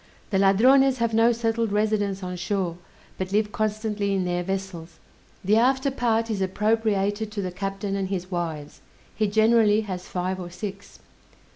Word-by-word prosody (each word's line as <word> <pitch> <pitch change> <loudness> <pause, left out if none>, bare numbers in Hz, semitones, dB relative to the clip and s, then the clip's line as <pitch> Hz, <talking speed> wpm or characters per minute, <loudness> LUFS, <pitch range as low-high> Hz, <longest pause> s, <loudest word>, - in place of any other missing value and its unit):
The 190 - +2
Ladrones 255 +7 +5
have 230 -2 0
no 225 +2 +5
settled 230 -1 -1
residence 205 -2 0
on 180 0 -4
shore, 180 -1 -2 0.4
but 185 0 -3
live 210 +1 +1
constantly 215 -2 -1
in 185 -1 0
their 175 0 -1
vessels. 180 -3 -5 0.5
The 210 +3 +4
after 265 +3 +2
part 230 -3 0
is 200 -3 -2
appropriated 210 +1 0
to 210 -1 -3
the 185 - -3
captain 195 +2 -4
and 195 -1 -2
his 185 -1 -4
wives; 160 -4 -4 0.3
he 215 - +1
generally 220 0 +4
has 185 -4 -6
five 185 +1 -3
or 175 -1 -6
six. 195 +2 -8
205 Hz, 160 wpm, -25 LUFS, 185-220 Hz, 0.5 s, Ladrones